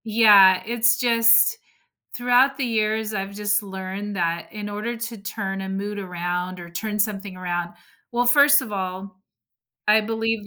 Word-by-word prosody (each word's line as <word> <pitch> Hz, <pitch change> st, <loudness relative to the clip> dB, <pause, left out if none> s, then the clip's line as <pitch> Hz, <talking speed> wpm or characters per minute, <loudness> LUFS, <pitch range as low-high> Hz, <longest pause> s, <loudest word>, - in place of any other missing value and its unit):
Yeah, 205 Hz, -4 st, +6 dB
it's 235 Hz, +1 st, +2 dB
just 230 Hz, -, +4 dB, 0.6 s
throughout 250 Hz, +2 st, +2 dB
the 275 Hz, -, -1 dB
years, 220 Hz, -1 st, -1 dB
I've 195 Hz, 0 st, -5 dB
just 205 Hz, 0 st, 0 dB
learned 195 Hz, +1 st, -7 dB
that 170 Hz, -1 st, -2 dB
in 210 Hz, -1 st, -6 dB
order 215 Hz, +4 st, -5 dB
to 235 Hz, 0 st, -6 dB
turn 195 Hz, -1 st, -5 dB
a 190 Hz, -, -6 dB
mood 200 Hz, +2 st, -5 dB
around 180 Hz, -1 st, -4 dB
or 175 Hz, -, -10 dB
turn 210 Hz, +5 st, -5 dB
something 205 Hz, -2 st, -2 dB
around 175 Hz, -1 st, -4 dB, 0.4 s
Well, 245 Hz, +1 st, 0 dB
first 285 Hz, +3 st, +6 dB
of 250 Hz, -5 st, -8 dB
all, 190 Hz, 0 st, -6 dB, 0.6 s
I 215 Hz, +1 st, +5 dB
believe 225 Hz, -1 st, -3 dB
210 Hz, 155 wpm, -22 LUFS, 190-230 Hz, 0.6 s, Yeah